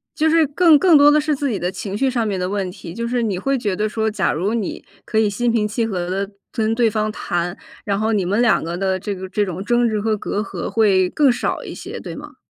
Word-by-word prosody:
就 320 0 +2
是 320 -1 +4
更 310 +1 +5
更 345 -3 +6
多 290 +1 +7
的 300 - +4
是 300 0 0
自 280 0 -2
己 210 - -2
的 175 - -1
情 190 +1 -5
绪 270 +4 +1
上 240 -3 0
面 200 -3 -2
的 180 - -1
问 195 -1 -2
题， 170 -2 -10
就 235 +3 -4
是 240 +1 -1
你 210 -5 -1
会 275 +8 0
觉 205 -6 -1
得 210 +3 0
说， 220 0 -1
假 195 -5 0
如 185 +8 -1
你 220 -5 -3 0.2
可 220 - 0
以 215 -1 +3
心 235 +4 0
平 220 -2 +1
气 225 +2 -1
和 180 -5 -3 0.2
地 200 - -18 0.2
跟 220 -2 0
对 230 0 +3
方 215 0 -1
谈， 175 -3 -3 0.3
然 200 0 -1
后 220 +1 +1
你 200 -3 +1
们 200 +6 +1
两 240 -2 +3
个 170 +2 -4
的 190 0 0
这 200 +2 -4
个 190 0 -7
这 205 +2 0
种 185 -1 -5
争 240 +2 +2
执 215 -1 -1
和 215 +1 0
隔 205 - -3
阂 215 - -4
会 195 -5 +3
更 290 +5 +3
少 245 - -1
一 - - -7
些， - - -7
对 - - -7
吗？ - - -10
215 Hz, 295 characters per minute, -20 LUFS, 190-240 Hz, 0.3 s, 多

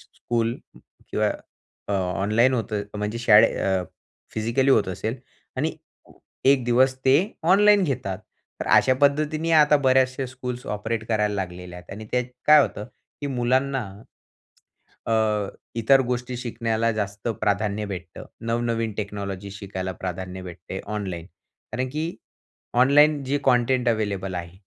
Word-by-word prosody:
School 115 0 -1 0.5
किंवा - - +1 0.6
अ, - - -3
online 100 +7 +2
होतं 110 -3 -2
म्हणजे 105 +2 -3
शाळे 110 -3 +6
अ, 95 -2 +1 0.5
फिजिकली 120 +5 +1
होत 105 -6 +3
असेल 110 +6 -3 0.4
आणि - - 0 0.7
ए 135 - +8
एक 135 -3 +2
दिवस 130 +2 +4
ते 130 +1 +6 0.3
ऑनलाईन 205 +1 +6
घेतात. 125 - -2 0.4
तर - - -3
अशा 130 - +5
पद्धतीने 155 +3 +2
आता 150 -2 +6
बऱ्याचशा 130 -1 +2
स्कूल्स 125 -1 -6
ऑपरेट 110 +2 -3
करायला 105 -2 +1
लागलेल्या 90 -2 -5
आहेत 90 - -15
आणि 110 +2 -7
त्यात 125 0 +1 0.2
काय 150 0 +8
होतं 105 - -3 0.4
की 145 - -2
मुलांना 130 +1 0 1.2
अ, 115 - +1 0.6
इतर 125 +4 +4
गोष्टी 125 0 -2
शिकण्याला 115 -2 -1
जास्त 105 +1 -4
प्राधान्य 105 0 0
भेटतं. 90 -4 -7 0.2
नवनवीन 115 -1 -1
टेक्नॉलॉजी 100 -1 -5
शिकायला 95 -2 -5
प्राधान्य 95 0 -5
भेटते 90 +1 -7 0.2
ऑनलाईन. 90 -5 -4 0.5
कारण 125 +3 -2
की 155 +4 -2 0.8
ऑनलाईन 145 +1 +5
जे 140 +2 0
कंटेंट 125 -1 +3
अवेलेबल 100 -4 -1
आहे 85 +1 -6
115 Hz, 130 wpm, -24 LUFS, 100-130 Hz, 1.2 s, ए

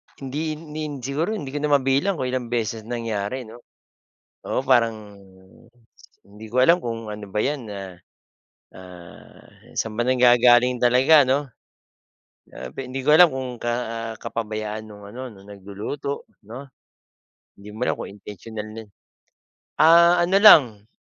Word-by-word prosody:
Hindi 150 +4 -4
hindi 155 0 -9 0.2
siguro, 155 - -2
hindi 140 -9 -6
ko 145 - -4
na 145 0 +2
mabilang 140 +8 +1
kung 130 -5 -3
ilang 125 -1 -3
beses 115 -2 -3
nangyari 115 0 -4
'no 115 +1 -13 0.9
oo, - - -1
parang, 115 -5 +1
hmm, 95 +3 -21 0.6
hindi 105 +2 -13
ko 115 - -7
alam 170 +5 +5
kung 115 -4 -6
ano 105 0 -8
ba 105 +2 -2
'yan, 140 -3 -3
ah. 95 -2 -8 0.8
Ah, 90 -2 -15 0.3
saan 110 -1 -3
ba - - +2
nanggagaling 125 0 +4
talaga 130 +5 +5
'no? 130 +2 +2 1.1
Grabe, - - -11
hindi 130 +1 -5
ko 135 +3 0
alam 180 +1 +8
kung 130 -1 -4
ka 120 0 -3 0.5
kapabayaan 110 -1 -5
nung 105 -1 -13
ano 125 +3 -8
nung 100 -1 -17
nagluluto 100 +8 -6 0.2
'no. 125 +7 -10 0.9
Hindi 100 +1 -14
mo 125 - -2
alam - - 0
kung - - -7
intensiyonal 105 +2 -9
na 110 +1 -8 1.0
ah, 170 +2 +6
ano 185 +2 0
lang, 200 -7 +9 0.2
ah 110 - -39
120 Hz, 145 wpm, -22 LUFS, 105-140 Hz, 1.1 s, lang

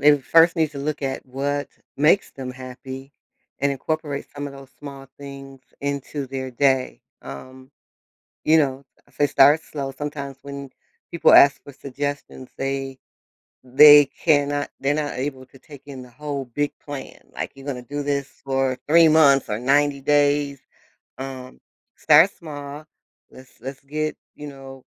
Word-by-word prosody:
they 145 +1 +6
first 165 +5 +4
need 160 -2 +1
to 140 - -7
look 150 +1 -3
at 135 -1 -3
what 140 +2 -3 0.3
makes 150 +7 +3
them 130 -2 -7
happy 130 +2 -9 0.5
and 140 0 +1
incorporate 150 +1 -4
some 145 0 -5
of 140 - -8
those 135 -1 -13
small 140 -2 -10
things 135 -1 -10 0.2
into 140 0 -4
their 130 0 -5
day, 130 0 +1 0.2
um, 130 - -11 0.7
you 160 +1 +5
know, 135 -3 0 0.2
if - - -27
they 145 - +2
start 145 +4 +5
slow 140 -4 -6
sometimes 140 -2 -6
when 140 -1 -8 0.4
people 170 - +4
ask 140 0 +7
for 140 - -12
suggestions, 140 -1 -6
they 135 -1 -3 0.7
they 145 +3 +8
cannot 145 -1 0
they're 140 +2 0
not 150 -1 -2
able 130 -1 -4
to 135 - -19
take 140 0 -14
in 135 -2 -9
the 125 - -13
whole 140 +1 -5
big 145 0 0
plan, 145 -2 -8 0.2
like - - -4
you're 135 +1 -13
gonna 125 -3 -4
do 145 +4 -5
this 140 -1 -2 0.2
for 135 -1 0
3 165 +1 +6
months 145 -4 +5
or 105 - -2
90 140 +2 +2
days. 145 0 +2 0.6
Um, 130 -1 -8 0.4
start 160 +5 +6
small, 145 -2 -9 0.5
let's 130 0 -16
let's 135 +1 -7
get, 155 +2 -3 0.2
you 150 0 -8
know, 135 -1 -12
140 Hz, 155 wpm, -22 LUFS, 135-145 Hz, 0.7 s, they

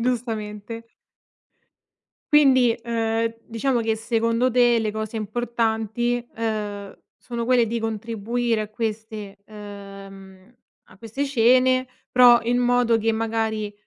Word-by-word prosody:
giustamente. 225 -2 -3 1.5
Quindi, 260 -5 +5
uhm, 225 -1 -1
diciamo 240 +2 -1
che 225 -1 0
secondo 230 +2 0
te 240 -1 +4
le 215 -2 -2
cose 220 +1 -5
importanti, 235 +1 -1
uhm, 210 -3 -4 0.2
sono 235 -1 -5
quelle 245 -1 +3
di 230 +1 -3
contribuire 225 +1 -2
a 215 - -4
queste 215 -2 -5
uhm, 195 -1 -12 0.3
a - - -20
queste 230 +7 -4
cene, 255 0 +3 0.2
però 245 -1 +6
in 240 +2 0
modo 245 -2 +2
che 225 +1 +1
magari 220 -1 -2
225 Hz, 115 wpm, -23 LUFS, 215-240 Hz, 1.5 s, però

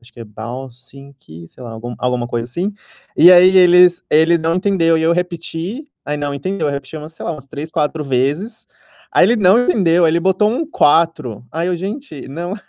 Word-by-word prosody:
acho 120 +1 -21
que 120 - -15
é - - -7
八 120 +5 -8
十 120 - -16 0.4
七, 85 -6 -14
sei 130 - -16
lá, 120 - -8
algum 120 +2 -8
alguma 125 -1 -2
coisa 120 -1 -3
assim. 175 +11 -4 0.4
E 175 - +7
aí 185 +1 +6
eles 180 -1 +5
ele 160 +3 +4
não 165 0 -1
entendeu 185 -4 +1
e - - -1
aí 160 - -1
eu 170 - +3
repeti, 180 - -4 0.2
aí 150 - -3
não 145 -1 -4
entendeu, 185 +7 -3
eu 145 - -1
repeti 140 +2 -7
umas, 155 +1 -9
sei - - -11
lá, - - -2
umas 145 -4 -11
3, 155 +3 -8
4 155 0 -2
vezes. 140 - -2 0.5
Aí - - +5
ele 240 - +2
não 210 +3 +4
entendeu. 180 -5 +2
Aí - - +3
ele 170 +2 0
botou 190 +4 +1
um 285 +8 -2
4, 150 - +1
aí 165 +2 -2
eu: 180 - -1
"Gente, 195 - -7
não!". 175 +7 -5
165 Hz, 220 wpm, -17 LUFS, 135-180 Hz, 0.5 s, E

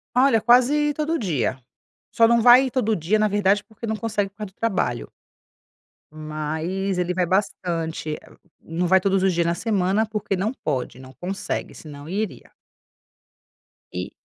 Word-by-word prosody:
Olha, 250 -4 +4
quase 280 +5 +4
todo 315 +2 -1
dia, 145 - -1 0.5
só 230 0 +5
não 235 -1 +4
vai 250 +2 +7
todo 225 -4 +1
dia, 185 +5 +1
na 215 - +3
verdade, 205 0 +2
porque 220 +1 -9
não 220 -1 -1
consegue 210 -3 -1
por 195 - -34
causa 210 -3 -7
do - - -49
trabalho. 185 - -1 1.0
Mas 155 +5 -3
ele 180 0 0
vai 180 0 +1
bastante. 165 -4 -2
Ah, - - -17 0.2
não 170 +2 -2
vai 190 +1 +5
todos 195 0 +1
os 190 -1 +3
dias 170 0 +1
na 170 - +1
semana, 200 +1 +1
porque 210 -2 -2
não 200 +5 -1
pode, 135 - -4
não 130 0 -12
consegue, 190 +6 -4
senão 145 0 -10
iria. 205 +1 -4 1.4
E 90 +1 -5
195 Hz, 160 wpm, -23 LUFS, 165-220 Hz, 1.4 s, vai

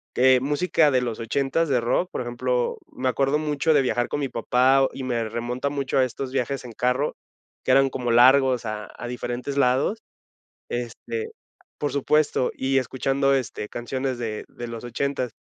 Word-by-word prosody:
que 130 0 +5
música 150 +3 +2
de 130 -2 +2
los 120 -3 -3
ochentas 135 +7 0
de 130 - +3
rock, 120 +10 0
por - - -3
ejemplo, 125 0 -1
me 130 - -3
acuerdo 135 +3 +2
mucho 150 +1 0
de 140 - +4
viajar 120 -1 0
con - - -3
mi 140 - -2
papá 125 +3 +3
o - - +2
y 135 - -6
me 115 -3 -1
remonta 120 +4 -2
mucho 140 -1 -1
a 130 - +5
estos 130 +1 -5
viajes 130 0 -2
en 120 - -8
carro, 125 +5 0 0.5
que - - -5
eran 135 +1 +5
como 125 -2 -3
largos 125 +1 +5
a 105 -1 -4
a 120 - -6
diferentes 125 +3 -4
lados, 140 - +2 0.7
este 285 - -4 0.5
por 145 - -2
supuesto, 145 -1 +2
y 135 +1 +1
escuchando, 135 +2 +1
este, 125 -5 -3
canciones 130 +1 -3
de 110 -3 -4
de 120 - -8
los 115 0 -7
ochentas. 125 0 -2
130 Hz, 180 wpm, -24 LUFS, 120-140 Hz, 0.7 s, que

